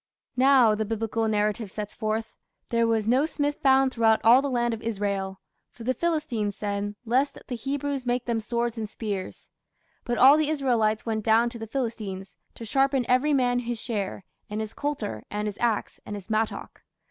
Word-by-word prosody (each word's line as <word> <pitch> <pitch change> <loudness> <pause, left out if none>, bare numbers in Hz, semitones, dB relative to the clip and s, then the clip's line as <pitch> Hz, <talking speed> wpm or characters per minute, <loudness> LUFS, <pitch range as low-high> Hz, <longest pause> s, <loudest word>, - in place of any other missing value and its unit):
"Now", 255 -3 +5
the 215 +1 -1
Biblical 225 +1 -1
narrative 210 0 0
sets 210 +1 -6
forth, 220 0 -3 0.4
"there 230 -1 +2
was 225 -2 +1
no 260 +6 +3
smith 290 -2 -1
found 265 -1 +4
throughout 225 -1 +3
all 240 +4 +7
the 280 - -2
land 240 -2 0
of 220 - -5
Israel; 200 -3 -2 0.3
for 235 - -12
the 255 +3 +1
Philistines 280 - -1
said, 205 0 -3
Lest 265 +5 +1
the 250 - -4
Hebrews 275 +2 -3
make 245 0 -1
them 235 -2 0
swords 235 +1 -2
and 215 -2 -4
spears; 205 -4 -5 0.6
but 240 -1 -2
all 275 +4 +8
the 310 -1 +1
Israelites 240 -8 +1
went 220 -2 -2
down 230 +2 +4
to 235 - -8
the 225 - -6
Philistines, 215 -6 -4 0.2
to 230 - -8
sharpen 270 +2 +2
every 255 +4 +3
man 245 -2 +2
his 240 -1 -4
share, 205 -5 -4 0.2
and 210 +1 -3
his 220 0 -4
coulter, 285 - -3
and 210 0 -2
his 205 - -5
axe, 235 -3 -1
and 205 - -6
his 200 +2 -9
mattock". 220 0 -2
230 Hz, 185 wpm, -26 LUFS, 215-255 Hz, 0.6 s, all